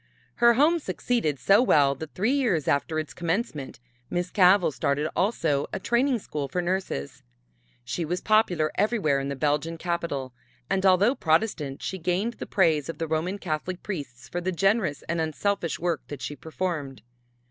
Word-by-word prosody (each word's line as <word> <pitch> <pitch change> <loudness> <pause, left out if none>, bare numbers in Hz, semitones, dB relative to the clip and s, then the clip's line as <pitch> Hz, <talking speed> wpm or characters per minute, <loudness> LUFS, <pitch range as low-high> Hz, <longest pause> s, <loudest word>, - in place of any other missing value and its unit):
Her 235 0 +6
home 315 +6 +4
succeeded 235 - -1
so 195 - +5
well 145 - +4
that 155 +3 -9
three 210 +7 +1
years 220 - +1
after 155 +3 +1
its 155 -5 -3
commencement, 165 - -3 0.3
Miss 175 +1 -2
Cavell 185 -2 +5
started 145 +2 0
also 165 -8 +1
a - - -3
training 245 +5 +2
school 150 -9 -4
for 160 +7 -3
nurses. 180 - -3 0.6
She 125 +8 -3
was 175 +3 -2
popular 180 -8 +2
everywhere 195 -9 +1
in 135 0 -3
the 140 - -3
Belgian 150 +3 0
capital, 165 -7 -3 0.4
and 195 0 +2
although 190 +6 +5
Protestant, 160 - 0
she 190 - -3
gained 185 +7 0
the - - -5
praise 160 -7 +2
of 165 - -5
the 165 - -2
Roman 160 +5 -1
Catholic 180 0 -4
priests 140 - -6
for 175 - -4
the 185 +2 -1
generous 195 -4 +1
and 170 0 -2
unselfish 170 +2 -1
work 170 -2 -1
that 140 -4 -7
she 145 - -4
performed. 155 -7 -4
170 Hz, 170 wpm, -26 LUFS, 150-195 Hz, 0.6 s, Her